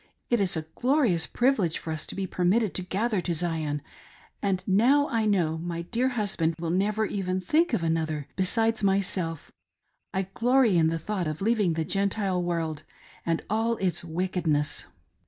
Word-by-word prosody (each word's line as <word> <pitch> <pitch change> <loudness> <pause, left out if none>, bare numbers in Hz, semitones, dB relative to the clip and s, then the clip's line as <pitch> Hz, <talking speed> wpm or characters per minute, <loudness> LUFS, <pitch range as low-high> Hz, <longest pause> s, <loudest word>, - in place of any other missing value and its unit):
It 240 -3 +3
is 185 -4 +1
a 155 - -4
glorious 245 - +2
privilege 235 -10 +1
for 160 - -5
us 155 - -5
to - - -5
be 195 - -2
permitted 190 +4 +1
to - - -2
gather 200 +3 -1
to 170 -1 -1
Zion, 155 -3 -1 0.6
and 190 -2 0
now 245 +9 +4
that - - -7
I 225 -1 +2
know 165 -6 +1
my 170 0 -4
dear' 240 +8 0
husband 165 -6 0
will 165 -1 -2
never 210 +4 +1
even 185 -2 -2
think 310 - +2
of 220 -8 0
another 160 -3 -1
besides 225 +4 +1
myself, 190 -5 -1 0.6
I 190 - 0
glory 245 -3 +3
in 165 -2 +4
the 165 +1 0
thought 185 +1 -3
of 155 0 -3
leaving 210 -4 +2
the 160 0 -1
Gentile 195 -1 0
world 165 -4 -2 0.5
and 165 -1 0
all 225 +2 +1
its 180 -4 0
wickedness. 165 -3 -1
185 Hz, 175 wpm, -27 LUFS, 165-215 Hz, 0.6 s, now